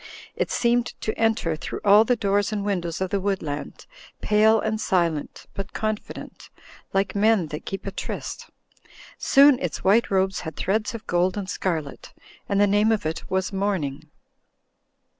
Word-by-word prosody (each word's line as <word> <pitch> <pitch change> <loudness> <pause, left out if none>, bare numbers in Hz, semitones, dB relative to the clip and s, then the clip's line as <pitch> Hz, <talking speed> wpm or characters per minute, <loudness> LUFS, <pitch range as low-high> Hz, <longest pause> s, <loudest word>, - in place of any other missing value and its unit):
It - - -1
seemed 240 0 +2
to 220 - -2
enter 220 -8 +1
through 155 - -6
all 205 +2 +7
the 245 - +2
doors 205 -1 0
and 205 -2 -2
windows 175 -4 -2
of 190 - -1
the 200 - +1
woodland, 185 -7 -4 0.3
pale 215 +1 +4
and 220 0 -2
silent 170 -5 -1
but 195 0 -6
confident, 215 -1 -5 0.4
like 195 -1 0
men 205 -5 +2
that 150 - -7
keep 195 - -5
a 195 - -3
tryst; - - -6 0.7
soon 275 -1 +6
its 170 -6 -4
white 210 +5 +4
robes 190 -1 +1
had 160 -3 -7
threads 220 +5 -1
of 225 - -8
gold 180 +2 +1
and 200 -2 -4
scarlet: 160 -7 -4 0.4
and 200 -1 +1
the 205 - +6
name 205 +2 +3
of 215 -7 0
it 160 +1 -4
was 190 +1 -1
morning. 190 -9 -2
200 Hz, 160 wpm, -24 LUFS, 180-215 Hz, 0.7 s, all